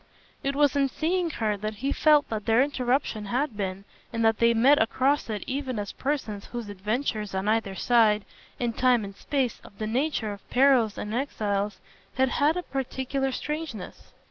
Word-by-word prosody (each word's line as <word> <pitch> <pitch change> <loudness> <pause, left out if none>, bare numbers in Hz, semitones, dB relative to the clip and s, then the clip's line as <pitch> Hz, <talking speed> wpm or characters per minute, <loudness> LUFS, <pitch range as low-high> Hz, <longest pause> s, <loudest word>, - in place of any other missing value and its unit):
It 275 0 -1
was 290 -1 +3
in 275 -1 +2
seeing 340 +5 0
her 220 -8 -1
that 215 +2 -4
he 270 +7 -2
felt 300 -1 +4
what 215 -2 -4
their 225 +3 +5
interruption 255 -5 -1
had 250 +4 -1
been, 195 -1 -4 0.3
and 230 -1 0
that 225 -1 +3
they 235 0 +4
met 270 +6 +5
across 265 +4 +1
it 210 -2 -3
even 265 -2 -3
as 205 -1 -3
persons 245 -8 -3
whose 235 -3 -6
adventures, 210 +1 -2
on 190 +2 -1
either 215 -3 +1
side, 215 -2 +3 0.3
in 240 -2 -1
time 250 -2 +3
and 195 0 -9
space, 265 -2 -2
of 200 - -15
the 215 - -3
nature 235 -2 -1
of 200 - -14
perils 250 -5 +4
and 210 - -4
exiles, 210 -6 -1 0.4
had 265 0 +3
had 295 +6 +2
a 360 - -2
peculiar 270 0 -2
strangeness. 300 - -5
240 Hz, 180 wpm, -26 LUFS, 210-275 Hz, 0.4 s, their